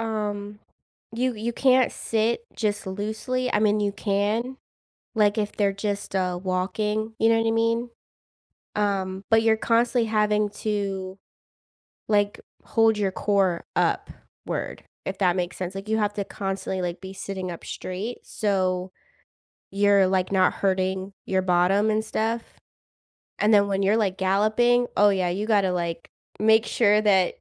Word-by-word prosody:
um, 210 Hz, -2 st, -3 dB, 0.6 s
you 250 Hz, +1 st, 0 dB
you 225 Hz, +3 st, -3 dB
can't 255 Hz, 0 st, +3 dB
sit 230 Hz, -, -1 dB
just 205 Hz, -2 st, -1 dB
loosely, 220 Hz, +6 st, -3 dB
I -, -, +2 dB
mean, 215 Hz, 0 st, +3 dB
you 205 Hz, -1 st, 0 dB
can, 210 Hz, +5 st, -1 dB, 0.6 s
like, 210 Hz, 0 st, +3 dB
if 210 Hz, -1 st, -1 dB
they're 200 Hz, -2 st, +1 dB
just, 200 Hz, 0 st, -4 dB
uh, 180 Hz, -2 st, 0 dB
walking, 210 Hz, +4 st, -1 dB
you 225 Hz, -, +4 dB
know 230 Hz, -, +4 dB
what 225 Hz, -, 0 dB
I -, -, +2 dB
mean? 230 Hz, +1 st, +1 dB, 0.9 s
Um, 195 Hz, -2 st, -1 dB
but 225 Hz, 0 st, +4 dB
you're 220 Hz, -1 st, +3 dB
constantly 235 Hz, +1 st, +2 dB
having 210 Hz, -1 st, +2 dB
to, 195 Hz, -3 st, -3 dB, 0.9 s
like, 205 Hz, -1 st, +1 dB, 0.2 s
hold 225 Hz, -1 st, +2 dB
your 200 Hz, -2 st, 0 dB
core 195 Hz, -4 st, 0 dB
upward, -, -, -3 dB, 0.2 s
if 190 Hz, -, -4 dB
that 180 Hz, -3 st, +3 dB
makes 180 Hz, -1 st, -3 dB
sense, 185 Hz, +1 st, -5 dB
like, 195 Hz, +1 st, -6 dB
you 220 Hz, 0 st, +1 dB
have 210 Hz, -1 st, 0 dB
to 200 Hz, -, -1 dB
constantly, 190 Hz, -1 st, -4 dB
like, 175 Hz, 0 st, -3 dB
be 190 Hz, 0 st, -8 dB
sitting 190 Hz, -1 st, -5 dB
up 170 Hz, -, -9 dB
straight, 195 Hz, +7 st, -5 dB
so 185 Hz, -3 st, -1 dB, 0.8 s
you're, 200 Hz, -1 st, +4 dB
like, 185 Hz, 0 st, 0 dB
not 185 Hz, -2 st, +4 dB
hurting 190 Hz, 0 st, -1 dB
your 190 Hz, 0 st, +1 dB
bottom 185 Hz, +4 st, +3 dB
and 215 Hz, 0 st, 0 dB
stuff. 225 Hz, +1 st, -1 dB, 1.0 s
And 210 Hz, +1 st, +3 dB
then 200 Hz, -1 st, +5 dB
when 195 Hz, 0 st, 0 dB
you're, 205 Hz, +3 st, +3 dB
like, 195 Hz, -4 st, 0 dB
galloping, 215 Hz, +6 st, +3 dB
oh 205 Hz, 0 st, +5 dB
yeah, 185 Hz, -3 st, +1 dB
you 200 Hz, +5 st, -2 dB
gotta, 200 Hz, -4 st, +3 dB
like, 170 Hz, -1 st, -3 dB, 0.3 s
make 220 Hz, +1 st, +4 dB
sure 210 Hz, -2 st, +3 dB
that 190 Hz, -4 st, +3 dB
205 Hz, 155 wpm, -25 LUFS, 190-220 Hz, 1.0 s, then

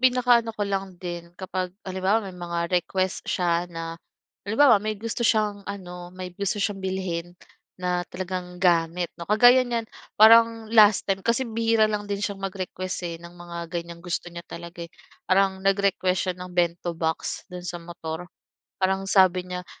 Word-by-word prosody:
pinakaano 245 Hz, -3 st, +3 dB
ko 205 Hz, -, 0 dB
lang 195 Hz, -2 st, -3 dB
din 175 Hz, -1 st, -6 dB
kapag, 185 Hz, -1 st, -3 dB, 0.2 s
halimbawa, 190 Hz, +3 st, 0 dB
may 190 Hz, -, -7 dB
mga 170 Hz, -1 st, -4 dB
request 185 Hz, +1 st, -2 dB
siya 175 Hz, -1 st, +1 dB
na, 165 Hz, -1 st, -5 dB, 0.5 s
halimbawa 220 Hz, +1 st, +5 dB
may 215 Hz, 0 st, -2 dB
gusto 230 Hz, +3 st, -5 dB
siyang 215 Hz, -3 st, +2 dB
ano, 180 Hz, -3 st, -7 dB
may 180 Hz, 0 st, -8 dB
gusto 200 Hz, +2 st, -2 dB
siyang 200 Hz, -1 st, -1 dB
bilhin, 180 Hz, -2 st, -3 dB, 0.4 s
na 180 Hz, -1 st, 0 dB
talagang 180 Hz, -1 st, -5 dB
gamit 175 Hz, -1 st, +2 dB
'no, 170 Hz, +1 st, -9 dB
kagaya 245 Hz, +4 st, +7 dB
niyan, 230 Hz, -1 st, -1 dB, 0.3 s
parang 225 Hz, 0 st, +6 dB
last 215 Hz, -3 st, +6 dB
time, 195 Hz, -1 st, 0 dB
kasi 235 Hz, +5 st, +1 dB
bihira 225 Hz, -1 st, +2 dB
lang 210 Hz, -1 st, -1 dB
din 200 Hz, -1 st, -1 dB
siyang 200 Hz, -1 st, -4 dB
mag-request 185 Hz, -1 st, -4 dB
eh, 170 Hz, -1 st, -3 dB
ng 170 Hz, +1 st, -12 dB
mga 170 Hz, -1 st, -7 dB
ganiyang 170 Hz, 0 st, -5 dB
gusto 175 Hz, 0 st, -4 dB
niya 170 Hz, -, -6 dB
talaga, 170 Hz, 0 st, -9 dB
eh. -, -, -48 dB, 0.4 s
Parang 190 Hz, 0 st, +3 dB
nag-request 190 Hz, -2 st, +1 dB
siya -, -, -17 dB
ng 180 Hz, 0 st, -8 dB
bento 170 Hz, -1 st, 0 dB
box, 160 Hz, -1 st, -2 dB
do'n 180 Hz, 0 st, -6 dB
sa 175 Hz, -, -3 dB
motor. 170 Hz, 0 st, -7 dB, 0.5 s
Parang 190 Hz, 0 st, 0 dB
sabi 185 Hz, -2 st, +5 dB
niya, 180 Hz, 0 st, -5 dB
185 Hz, 165 wpm, -25 LUFS, 175-205 Hz, 0.5 s, kagaya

